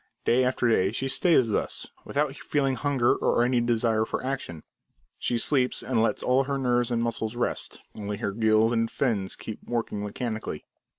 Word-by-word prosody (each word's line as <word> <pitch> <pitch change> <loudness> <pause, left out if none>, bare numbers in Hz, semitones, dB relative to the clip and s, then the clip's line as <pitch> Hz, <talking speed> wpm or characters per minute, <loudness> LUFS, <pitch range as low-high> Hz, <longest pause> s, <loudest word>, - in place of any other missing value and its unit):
Day 125 +2 +4
after 125 -1 +1
day 95 -4 +3
she 130 +4 -2
stays 135 -4 +3
thus, 105 - -2 0.2
without 145 -1 -1
feeling 140 -2 0
hunger, 135 -3 +2
or 120 - +2
any 125 0 +2
desire 115 -2 +2
for - - -3
action. 130 - -4 0.6
She 120 - 0
sleeps 125 +1 +1
and 120 -4 +1
lets 115 - 0
all 130 +2 +3
her 140 0 -1
nerves 125 -2 +1
and 120 -1 0
muscles 115 -1 -2
rest; 120 - -3 0.2
only 105 0 -4
her 100 -2 -2
gills 110 +1 +3
and 115 -1 +1
fins 105 -9 -1
keep 110 - -7
working 115 -3 -3
mechanically. 110 - -4
120 Hz, 175 wpm, -26 LUFS, 110-130 Hz, 0.6 s, Day